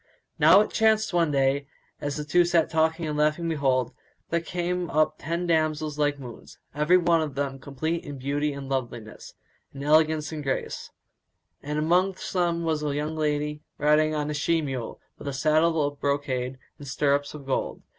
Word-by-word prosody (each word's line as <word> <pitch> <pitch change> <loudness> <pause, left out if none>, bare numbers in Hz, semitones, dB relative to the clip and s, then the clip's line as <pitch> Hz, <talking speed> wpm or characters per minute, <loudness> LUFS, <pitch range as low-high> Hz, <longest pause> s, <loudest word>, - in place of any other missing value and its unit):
Now 195 - +7
it 215 - -2
chanced 220 -2 +2
one 170 -2 +3
day, 140 0 +1 0.3
as 145 0 -3
the 150 - -3
two 175 +4 +4
sat 170 -2 +2
talking 160 +1 +1
and 150 -1 -2
laughing 150 +3 +1
behold, 135 -6 0 0.4
there 170 - +2
came 175 +1 -2
up 155 +1 +1
ten 170 +3 -2
damsels 155 -2 0
like 145 -1 +1
moons, 125 -5 -11 0.2
every 150 +5 +4
one 170 -2 +3
of 150 -4 -4
them 135 -1 -2
complete 155 +5 -3
in 145 -1 -7
beauty 145 +3 -1
and 140 -1 -7
loveliness, 120 -5 -5 0.4
and 140 - -6
elegance 155 +1 +3
and 155 -1 -5
grace; 135 -2 -3 0.7
and 150 +1 -4
amongst 180 +5 +1
them 170 -2 +1
was 160 -2 0
a 145 -2 -2
young 150 +2 -2
lady 150 -1 -1 0.2
riding 155 +1 +3
on 150 0 -1
a - - -2
she 165 +3 +1
mule 135 -6 -4 0.2
with - - -8
a 140 - -2
saddle 155 +2 +2
of 145 0 -4
brocade 135 -3 -1 0.2
and 145 - -9
stirrups 140 +2 0
of 145 -2 -10
gold. 135 - -2
150 Hz, 180 wpm, -26 LUFS, 140-165 Hz, 0.7 s, Now